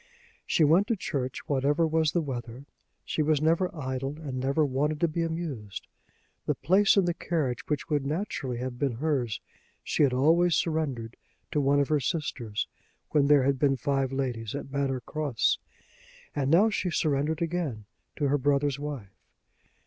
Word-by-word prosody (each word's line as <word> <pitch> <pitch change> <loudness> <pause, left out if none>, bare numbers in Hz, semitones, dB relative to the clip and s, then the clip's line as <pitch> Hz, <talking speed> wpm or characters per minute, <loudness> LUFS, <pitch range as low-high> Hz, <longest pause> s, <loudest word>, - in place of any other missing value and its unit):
She 160 - +3
went 170 +7 +5
to 230 - +1
church 130 -9 -4
whatever 145 +4 +2
was 160 -1 +2
the 170 -1 0
weather. 125 -1 -6 0.4
She - - -1
was 155 -1 +2
never 165 +4 +2
idle 135 -2 -4
and 135 -5 -5
never 140 +4 +2
wanted 145 +3 0
to 170 - +4
be 165 +2 -2
amused. 160 - -4 0.6
The - - +1
place 195 +3 +4
in 195 - +5
the 175 - +1
carriage 150 -8 -2
which 150 0 -1
would 150 -4 0
naturally 145 - -3
have 125 0 -5
been 140 -4 +1
hers 130 -4 -1 0.4
she - - -1
had 140 -3 +5
always 165 +7 +4
surrendered 140 -8 -1 0.3
to 150 - +1
one 140 +1 +3
of 140 - +1
her 150 -1 +3
sisters 120 -7 -2 0.4
when 145 -2 +3
there 145 -2 +6
had 135 0 +1
been 135 -1 +3
five 135 -1 0
ladies 125 -5 -3
at 135 - -6
Manor 135 -2 -1
Cross, 135 -6 0 0.8
and 140 -2 0
now 195 +8 +5
she 185 - -1
surrendered 155 0 0
again 160 -11 -3 0.3
to 145 - 0
her 145 +1 +2
brother's 140 0 +1
wife. 140 -10 -6
145 Hz, 170 wpm, -28 LUFS, 130-160 Hz, 0.8 s, there